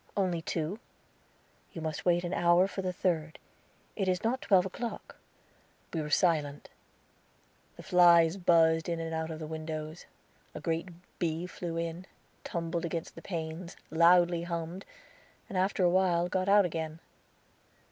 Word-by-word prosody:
"Only 180 -4 0
two." 165 +5 -3 0.9
"You 165 - -6
must 155 -1 -4
wait 175 0 +3
an 175 +1 -3
hour 175 +1 +4
for 195 - -5
the 185 -1 -2
third; 165 -4 -1 0.6
it 195 -3 -1
is 185 -1 0
not 245 +3 0
twelve 195 -2 +4
o'clock." 230 +5 -6 0.8
We 165 - -1
were 150 - -5
silent. 150 -4 +1 1.1
The - - -11
flies 170 -1 +6
buzzed 165 -2 +3
in 170 -1 -1
and 165 0 -4
out 160 0 -2
of 160 - -5
the 155 - -6
windows; 155 +1 -6 0.5
a - - -4
great 165 +1 -2 0.3
bee 165 0 -1
flew 175 -2 -5
in, 170 +2 -4 0.4
tumbled 170 0 -3
against 165 -1 -4
the 165 - -11
panes, 165 0 -5
loudly 170 +1 +5
hummed, 170 +2 -5 0.6
and 200 - -8
after 190 +1 +1
a 175 - +5
while 175 -2 +2
got 185 +1 0
out 205 -1 +6
again. 160 -2 -4
170 Hz, 150 wpm, -30 LUFS, 160-185 Hz, 1.1 s, flies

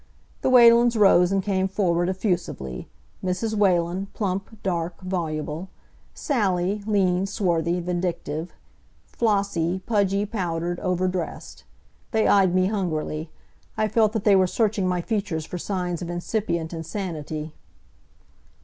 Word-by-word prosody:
The - - +1
Whalens 235 -1 +6
rose 185 -3 +5
and 195 -1 +1
came 190 -1 +1
forward 180 -3 +1
effusively; 180 - -3 0.4
Mrs. 190 +4 -1
Whalen, 185 -2 +1
plump, 195 +2 -3
dark, 170 -2 -2
voluble; 165 -2 -3 0.5
Sally, 200 - 0
lean, 190 -3 +2
swarthy, 175 -3 0
vindictive; 175 -2 -3 0.5
Flossie, 200 -6 0
pudgy, 200 -2 +1
powdered, 175 -4 -2
over 185 0 0
dressed. 180 -2 -5 0.5
They 220 -1 +3
eyed 190 -3 +4
me 185 0 +4
hungrily. 160 -6 -2 0.5
I 215 0 +2
felt 215 -1 +2
that 220 -3 -2
they 205 -2 +5
were 185 -1 +4
searching 205 -1 0
my 180 -1 0
features 195 -6 -2
for 180 - -6
signs 180 -2 -3
of 175 - -5
incipient 175 -2 -2
insanity. 160 -3 -5
185 Hz, 120 wpm, -24 LUFS, 170-205 Hz, 0.5 s, Whalens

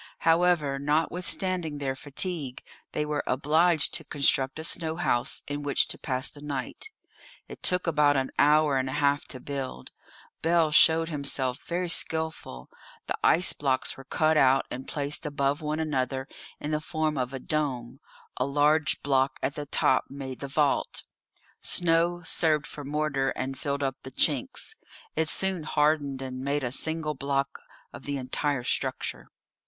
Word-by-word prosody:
However, 165 -4 +3
notwithstanding 165 +2 0
their 135 -2 -2
fatigue, 145 -1 -3 0.3
they 150 - -1
were 150 -1 -2
obliged 155 +4 +2
to - - -2
construct 135 -1 +2
a 160 - -5
snow 160 -1 0
house 120 -7 0
in 145 0 -3
which 145 -1 +2
to - - -3
pass 130 -3 +2
the 145 - -6
night. 145 - -5 0.6
It - - -11
took 180 0 +2
about 150 -3 +3
an 130 0 -1
hour 150 -1 +4
and 130 0 -1
a - - -4
half 145 -1 +1
to 130 - -7
build. 135 - -5 0.5
Bell 165 -1 +3
showed 160 +1 +6
himself 140 -4 -1
very 175 +1 -1
skilful. 160 - -1 0.4
The - - -2
ice 175 +2 +4
blocks 135 -3 0
were 135 - -11
cut 155 +3 +2
out 135 -1 +4
and 130 +2 -6
placed 145 0 -2
above 145 +1 0
one 155 +1 -2
another 135 -3 -1 0.3
in 150 - -4
the 155 0 0
form 155 -1 -1
of 125 -2 -2
a 135 - -4
dome; 130 -4 -2 0.4
a 125 - +1
large 145 +1 +2
block 135 -1 +2
at 140 - 0
the 145 +1 -6
top - - +2
made 135 -2 -7
the 140 - -5
vault. 145 0 0 0.6
Snow 175 0 +2
served 155 -2 +1
for 145 - -8
mortar 140 -2 0
and 135 +1 -3
filled 140 +1 -2
up 135 -1 -2
the - - -8
chinks. 150 - 0 0.4
It 160 -1 +1
soon 190 -1 0
hardened 150 -3 +1
and 130 -1 -6
made 140 +1 -1
a 120 - -2
single 160 +2 +1
block 140 0 -2 0.3
of 120 - -10
the 145 -1 -2
entire 130 +1 -1
structure. - - -2
145 Hz, 160 wpm, -27 LUFS, 135-160 Hz, 0.6 s, showed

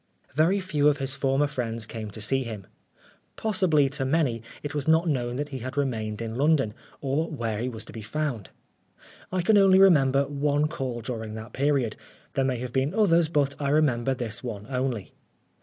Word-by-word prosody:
Very 165 +8 +3
few 155 -6 +1
of 145 - +1
his 135 -1 -2
former 140 +1 +1
friends 115 -5 -3
came 110 -1 -6
to 105 - -8
see 135 +5 +1
him. 110 -5 -7 0.7
Possibly, 185 -9 +2
to 140 0 -2
many 135 -5 +1 0.2
it 145 0 -4
was 145 -1 -3
not 160 +2 +4
known 125 -5 -1
that 145 +2 -3
he 135 -2 -5
had 130 +3 -6
remained 115 -5 -1
in 110 -1 -4
London, 135 -3 +2 0.3
or 145 +4 0
where 115 -8 -3
he 125 +2 -1
was 110 -3 -7
to - - -12
be 110 - -7
found. 130 -3 -3 0.8
I 185 -1 0
can 210 +3 +5
only 190 -1 +6
remember 140 -8 +5
one 145 +1 +1
call 130 -7 -4
during 110 -2 -5
that 110 +2 -8
period. 135 -5 +1 0.4
There 135 - +1
may 130 -1 0
have 125 0 -6
been 135 +7 0
others, 170 -7 +4
but 145 -3 +1
I 140 - 0
re 150 +2 +4
member 130 -2 +1
this 115 -2 -4
one 105 -4 -5
only. 125 -5 -2
135 Hz, 195 wpm, -26 LUFS, 120-150 Hz, 0.8 s, only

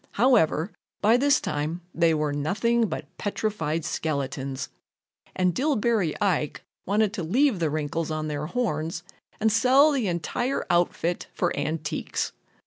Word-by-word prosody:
However, 205 - +3 0.3
by 215 +3 +4
this 280 +3 +4
time 155 +4 -3
they 165 -1 +3
were 150 -1 0
nothing 220 +11 +1
but - - -4
petrified 165 -7 -2
skeletons, 140 -4 -3 0.7
and 180 -1 +2
Dillbery 225 - +1
Ike 175 -7 0 0.2
wanted 205 +1 +2
to 195 -6 -3
leave 235 - +2
the 165 -2 +1
wrinkles 155 +2 -2
on 155 0 -2
their 150 0 -3
horns 170 -7 -2 0.4
and 220 0 +3
sell 260 +7 +5
the 260 -7 0
entire 185 - -1
outfit 175 0 +1
for 175 - 0
antiques. 150 +1 -2
175 Hz, 135 wpm, -26 LUFS, 155-225 Hz, 0.7 s, sell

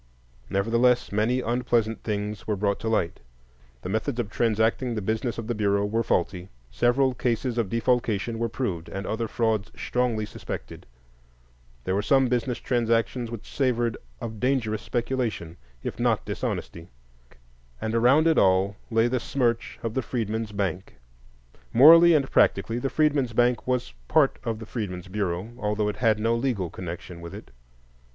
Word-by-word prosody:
Nevertheless, 115 +5 +2
many 110 +5 +1
unpleasant 120 -2 0
things 105 -1 -4
were 105 - +1
brought 100 0 0
to 110 - -2
light,—the - - -5
methods 110 +6 -2
of 110 -3 -2
transacting 115 +2 +1
the - - -1
business 110 +3 -1
of 115 - -4
the 120 - -2
Bureau 100 -2 +1
were 110 +3 0
faulty; 90 -2 -1 0.2
several 130 +2 +2
cases 120 0 -1
of 110 -5 0
defalcation 115 -1 0
were 115 0 0
proved, 100 -9 -3
and 95 0 -5
other 110 +3 -2
frauds 110 -3 0
strongly 120 -3 -1
suspected; - - -8 1.0
there 95 - -1
were 100 - +1
some 135 +3 +3
business 125 0 0
transactions 115 0 0
which 115 -3 -8
savored 120 -4 +1 0.2
of 110 -2 -6
dangerous 115 -4 0
speculation, 120 -9 -2 0.3
if - - -5
not - - +1
dishonesty; 85 0 -4 0.9
and 110 - -3
around 125 +7 +4
it 165 -1 +4
all 95 +2 +3
lay 115 0 +3
the 125 +1 0
smirch 120 -1 -1
of 115 -1 -2
the 130 - 0
Freedmen's 110 -2 -3
Bank. 95 -3 -3 0.8
Morally 165 +6 +8
and 140 -3 +1
practically, 115 +1 +2
the 135 - -1
Freedmen's 145 -6 +1
Bank 120 +1 +2
was 125 - -1
part - - +3
of 115 -2 -2
the 110 - -8
Freedmen's 90 -6 -5
Bureau, 95 +1 -2
although 105 -1 0
it 105 - -5
had 110 -2 +2
no 115 +2 +1
legal 115 -8 -1
connection 85 -1 -7
with 85 0 -8
it. - - -11
115 Hz, 155 wpm, -26 LUFS, 100-120 Hz, 1.0 s, Morally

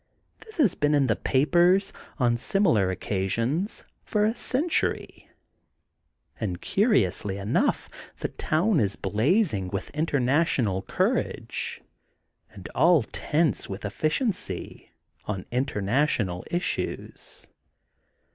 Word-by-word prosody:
This 440 0 -13
has 270 - +4
been 150 0 +1
in 140 -2 +3
the 110 -4 +2
papers, 175 +8 +3 0.2
on 120 -4 +2
similar 120 - +2
occasions, 115 - -2 0.2
for 210 -1 +1
a 220 - +2
century. 300 +7 -1 1.1
And 90 -6 -3
curi 205 - +3
ously 95 +2 -4
enough, 100 +3 0 0.3
the - - -3
town 170 +3 +1
is 100 -2 0
blazing 120 - +1
with 95 +1 -5
inter 150 -1 0
national 125 - +1
courage 95 - -2 0.7
and 95 - -10
all 165 -1 +5
tense 155 -4 0
with 95 +1 -6
efficiency 155 - -2 0.4
on 95 -3 -4
international 115 -5 0
issues. 175 +1 -4
135 Hz, 105 wpm, -26 LUFS, -, 1.1 s, all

